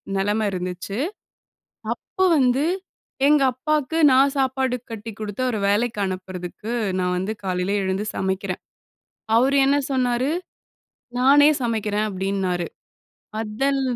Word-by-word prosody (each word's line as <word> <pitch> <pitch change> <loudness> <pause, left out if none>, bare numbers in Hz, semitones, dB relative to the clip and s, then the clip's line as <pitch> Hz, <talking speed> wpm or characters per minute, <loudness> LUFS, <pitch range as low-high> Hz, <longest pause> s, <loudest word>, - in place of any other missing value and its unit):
நெலம 205 +2 +1
இருந்துச்சு. 180 +2 -4 1.0
அப்ப - - -23 0.2
வந்து 260 +1 +3 0.6
எங்க 295 0 +5
அப்பாக்கு 305 +3 -1
நான் 270 +2 +5
சாப்பாடு 260 -1 +1 0.2
கட்டி 225 0 -6
குடுத்து 210 +2 -4
அவர 240 -3 -1
வேலைக்கு 215 +1 +1
அனுப்புறதுக்கு, 185 +3 -5 0.3
நான் 180 0 0
வந்து 190 +4 -2
காலையில 185 +1 -1
எழுந்து 190 +2 -1
சமைக்கிறன். 190 -1 -2 0.8
அவரு 265 +4 +4
என்ன 280 +1 +4
சொன்னாரு? 255 0 +1 0.9
நானே 285 +3 +6
சமைக்கிறேன் 215 -2 0
அப்டின்னாரு. 190 -2 -1 0.7
அதல் 270 +6 0
215 Hz, 105 wpm, -23 LUFS, 190-260 Hz, 1.0 s, நானே